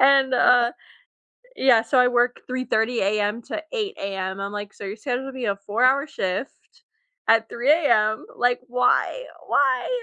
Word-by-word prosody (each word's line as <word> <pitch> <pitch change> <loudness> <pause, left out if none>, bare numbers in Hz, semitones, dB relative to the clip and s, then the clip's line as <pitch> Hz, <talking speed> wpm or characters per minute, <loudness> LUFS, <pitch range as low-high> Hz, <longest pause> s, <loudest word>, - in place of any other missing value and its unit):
And, 270 -1 +5
uh 245 -1 +4 0.8
yeah, 250 -4 +4
so 240 +3 0
I 250 - +6
work 245 0 +1
3:30 245 -2 -1
AM 210 +3 0
to 315 - -6
8:00 425 -4 -3
AM. 195 -1 -4
I'm 200 +1 -4
like, 205 0 -6
"So - - -11
you're 195 +2 -5
scheduling 260 +3 -4
me 255 -2 -4
a 200 -2 0
4 205 +5 -1
hour 275 +3 +3
shift 190 0 -6 0.5
at 225 0 +4
3:00 245 +5 -1
AM. 220 -9 +2
Like, 245 0 +1
why? 250 - +1 0.2
Why?" 260 -3 +1
245 Hz, 160 wpm, -23 LUFS, 210-260 Hz, 0.8 s, I